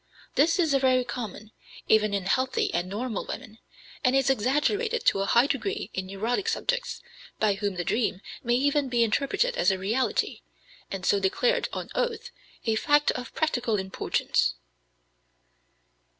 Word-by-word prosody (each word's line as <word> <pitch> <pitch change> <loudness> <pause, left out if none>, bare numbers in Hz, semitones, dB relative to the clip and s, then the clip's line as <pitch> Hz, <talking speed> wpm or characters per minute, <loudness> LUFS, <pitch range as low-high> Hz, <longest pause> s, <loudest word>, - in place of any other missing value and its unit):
This 325 +4 +3
is 325 -5 +2
very 260 -2 +3
common, 225 -3 -6 0.4
even 215 -1 +4
in 195 -2 -2
healthy 260 +6 +1
and 175 +2 -1
normal 220 +2 -3
women, 220 +1 -8 0.4
and 255 -1 +3
is 270 0 +3
exaggerated 300 - 0
to - - +4
a 195 - 0
high 235 +5 +5
degree 395 +9 -2
in 190 0 -3
neurotic 225 - -2
subjects, - - -1 0.4
by 215 -2 +3
whom 200 -1 -2
the 175 - -2
dream 215 0 0 0.2
may 240 -1 +2
even 285 +1 +1
be 240 -1 +3
interpreted 400 - +1
as - - +3
a 190 - +1
reality, 220 - -1 0.5
and 190 -2 -5
so 200 - +3
declared 485 - +1
on - - -5
oath, 480 -2 -2 0.3
a 225 - +2
fact 290 +4 +3
of 250 - -7
practical 245 -8 0
importance. 190 - 0
245 Hz, 150 wpm, -27 LUFS, 205-295 Hz, 0.5 s, high